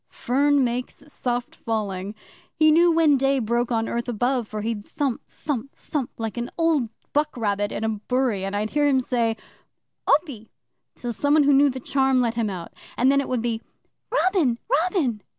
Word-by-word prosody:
Fern 280 +3 +2
makes 245 +3 -3
soft 245 -1 -2
falling! 205 -3 -3 0.4
He 310 0 +5
knew 340 +2 +5
when 320 -4 +4
day 270 +1 +2
broke 240 0 0
on 225 -1 +1
earth 235 +1 -3
above, 245 +1 0
for 215 0 -5
he'd 220 -1 -3
thump, 270 +2 -2
thump, 275 -3 -5
thump, 285 -6 -3
like 225 0 -4
an 240 0 -3
old 320 -8 +2 0.2
buck 300 -1 0
rabbit 205 -2 0
in - - -4
a - - +1
bury, 220 -1 -1
and 195 +1 -3
I'd 210 +1 -1
hear 295 0 +2
him 270 -2 +3
say 235 -3 0 0.7
"Opy!" 280 -8 +1 0.5
till 240 -1 -4
some 285 +6 +2
one 310 - +5
who 285 0 +4
knew 280 +1 +5
the 260 0 -4
Charm 265 0 +2
let 235 -2 +1
him 230 -2 -1
out, 180 -3 -7 0.2
and 260 +2 +4
then 280 0 +3
it - - -6
would 250 -3 -1
be 230 -2 -1 0.5
"Robin! 370 - +2
Robin!" 305 - +1
250 Hz, 185 wpm, -24 LUFS, 225-285 Hz, 0.7 s, He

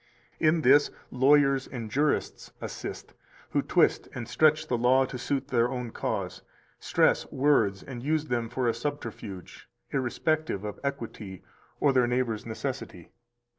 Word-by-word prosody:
299 155 +1 +4
In 165 - -1
this 145 - +3 0.2
lawyers 135 +1 +4
and 115 -4 -6
jurists 145 +4 0
assist, - - -7 0.4
who - - +2
twist - - +2
and 120 - -5
stretch 155 0 +3
the 125 - 0
law 125 +3 +4
to 125 -1 -7
suit 135 +2 -1
it 135 - -27
to - - -3
their 120 +1 +1
cause, - - -3 0.4
stress - - +2
words 120 -9 +2
and 125 -3 -7
use 155 +3 0
them 120 -5 -2
for 125 0 -1
a 115 - +2
subterfuge, 115 - -6 0.2
irrespective 135 -2 -1
of 105 -1 -6
equity 115 -8 -5 0.4
or 140 -2 +3
their 125 -2 +4
neighbor's 120 -3 -1
necessity. 115 -7 -5
130 Hz, 150 wpm, -28 LUFS, 115-145 Hz, 0.4 s, 299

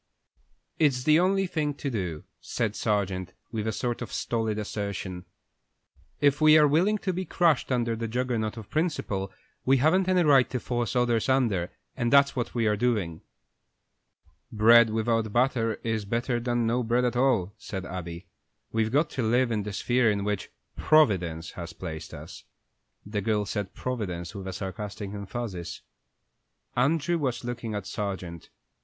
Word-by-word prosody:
"It's 135 -5 +3
the 155 +3 +5
only 195 +2 +2
thing 150 -5 -1
to 140 -1 -4
do," 90 -9 -3 0.2
said 110 -3 -2
Sargent, 95 -4 -1 0.2
with 110 -2 -3
a - - +1
sort 120 +3 -2
of 120 - -5
stolid 110 -2 -1
assertion. 100 -3 -4 0.9
"If 145 +1 +3
we 155 0 +8
are 150 -1 +6
willing 180 +9 +3
to 190 -2 -2
be 185 +2 -2
crushed 170 -7 +2
under 120 -2 +1
the 115 +1 -3
Juggernaut 120 -2 -1
of 110 -3 -10
principle, 130 - -1 0.3
we 135 +1 +4
haven't 180 +8 +3
any 180 -1 +4
right 140 -5 +5
to 125 - -2
force 120 0 -2
others 120 -1 +2
under, 115 -10 +2 0.3
and 120 0 -1
that's 140 0 +5
what 125 -1 -3
we 115 -2 +1
are 105 -1 +3
doing." 105 -8 -1 1.3
"Bread 115 +1 +6
without 110 0 0
butter 120 -2 +1
is 110 -2 -1
better 120 +4 -1
than 120 -1 0
no 120 +2 +1
bread 120 +1 +1
at 125 - 0
all," 120 -7 +2
said 95 -2 -6
Abby. 85 -1 -6 0.5
"We've 110 -1 0
got 150 +4 +2
to 130 - -2
live 120 +2 +2
in 110 -2 0
the 105 +1 -5
sphere 120 +3 +2
in 100 -1 0
which 105 -2 -2 0.3
Providence 90 - +2
has 85 -1 -7
placed 80 -3 -7
us." - - -10 0.6
The 105 0 -3
girl 105 0 0
said 100 -2 -4
"Providence" 90 -9 -4
with 95 -2 -7
a 95 - -4
sarcastic 100 +1 -5
emphasis. 100 -3 -5 0.9
Andrew 155 +6 +2
was 130 -4 -2
looking 120 -2 -4
at 100 -2 -4
Sargent. 95 -5 -5
115 Hz, 160 wpm, -27 LUFS, 100-130 Hz, 1.3 s, we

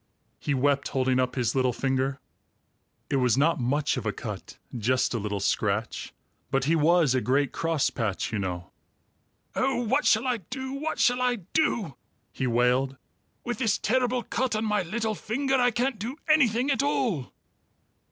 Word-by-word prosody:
he 145 - -1
wept, 140 +1 +1
holding 130 -2 +1
up 125 0 0
his 120 -3 0
little 130 -1 +2
finger. 135 +2 -1 0.9
(It 140 - +2
was 125 -2 +2
not 155 +3 +3
much 140 +4 0
of - - -4
a - - +1
cut; - - -7 0.2
just 125 +3 +1
a 115 - -1
little 100 -1 -3
scratch; 100 +2 -1 0.4
but 135 -1 +1
he 160 +4 +2
was 160 -2 +4
a 130 - +1
great 135 +2 +1
crosspatch, 135 - -1
you 105 - 0
know.) 90 -2 -4 0.8
"Oh, 265 +1 +1
what 265 +6 +1
shall 220 +3 +4
I 250 -2 +1
do? 260 +7 -6
What 305 +3 -3
shall 245 0 +3
I 250 -1 +2 0.2
do?" 235 - 0 0.4
he 130 - -2
wailed. 125 +3 +2 0.5
"With 240 -3 -3
this 225 -5 +2
terrible 250 +1 +1
cut 250 0 -1
on 215 +1 -1
my 210 -1 +1
little 220 +5 -2
finger, 270 +6 -2
I 245 -1 +4
can't 245 0 -1
do 235 +7 -4
anything 270 -4 +3
at 270 - +1
all!" 245 - 0
160 Hz, 170 wpm, -27 LUFS, -, 0.9 s, was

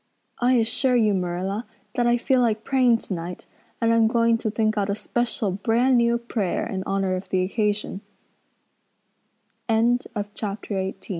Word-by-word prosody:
I 245 +1 +3
assure 245 +2 +2
you, 215 -4 +3
Marilla, 185 +4 -2 0.3
that 240 -1 +1
I 240 0 +4
feel 255 +1 +2
like 220 -2 +1
praying 250 -3 +3
tonight 180 -4 -6 0.3
and 230 -1 +2
I'm 230 -1 +4
going 230 0 +2
to 220 - -2
think 215 0 0
out 205 -1 0
a 200 - 0
special 225 -2 -1
brand 235 +6 +2
new 235 0 +3
prayer 230 -5 -2
in 190 -5 -3
honor 195 -1 0
of 185 +1 -6
the 185 -1 +1
occas 210 -1 -1
225 Hz, 140 wpm, -24 LUFS, 195-235 Hz, 0.3 s, I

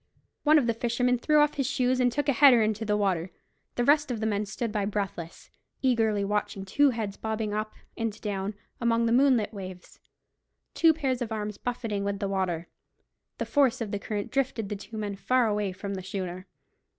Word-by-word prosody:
One 310 +1 +5
of 285 - +3
the 230 - +1
fishermen 240 +2 0
threw 300 +5 +3
off 295 0 +3
his 275 -3 0
shoes, 255 -1 +1
and 250 -1 +3
took 290 +4 -1
a 280 - +4
header 250 -3 +7
into 215 0 -1
the 210 -1 +1
water. 190 -4 0 0.5
The 245 - +1
rest 295 +2 +4
of 240 -3 -2
the 220 - -2
men 210 -1 0
stood 210 +3 -3
by 210 -2 -1
breathless, 195 -5 -4 0.3
eagerly 220 -5 +2
watching 200 -1 -2
two 285 +9 +4
heads 220 -5 -3
bobbing 220 -1 -3
up 215 +1 -3 0.2
and 225 -2 -3
down 200 -1 -3 0.2
among 235 -1 +2
the 230 - +1
moonlit 245 -4 +3
waves, 185 -3 -9 0.7
two 330 -1 +5
pairs 270 -5 -1
of 235 -2 -3
arms 210 -1 -4
buffeting 225 -5 -3
with 200 0 -1
the 200 0 -2
water. 180 -4 -1 0.7
The - - -2
force 270 -3 +2
of 220 -4 -4
the 205 - -2
current 205 0 -4
drifted 255 -6 -1
the 210 - -2
two 220 +3 -9
men 205 -2 -3
far 250 +4 +2
away 210 -2 0
from 200 +2 -6
the 190 - -4
schooner. 185 -1 -5
220 Hz, 200 wpm, -27 LUFS, 200-250 Hz, 0.7 s, header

